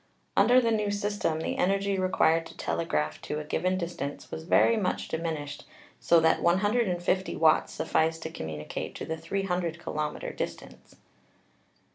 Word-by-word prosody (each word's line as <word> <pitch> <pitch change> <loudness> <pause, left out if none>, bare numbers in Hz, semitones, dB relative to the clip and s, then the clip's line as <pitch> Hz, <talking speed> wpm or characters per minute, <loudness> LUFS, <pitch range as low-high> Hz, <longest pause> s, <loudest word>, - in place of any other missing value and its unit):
Under 240 +6 +6
the 230 -2 +1
new 210 -2 +1
system 205 -6 -1
the - - -2
energy 195 +1 +1
required 165 -3 +2
to - - -14
telegraph 165 -2 -1
to 150 - -4
a - - -4
given 185 +5 0
distance 170 -5 -5
was 160 - -6
very 230 +6 +4
much 200 -5 -1
diminished, 160 -3 -4 0.4
so 170 - +5
that 160 0 +3
150 190 0 +1
watts 160 -1 +3
sufficed 160 0 0
to 160 - -5
communicate 80 - -5
to - - -5
the 160 - -3
300 175 0 -2
kilometec 155 -3 -4
distance. - - -7
170 Hz, 145 wpm, -28 LUFS, 160-195 Hz, 0.4 s, Under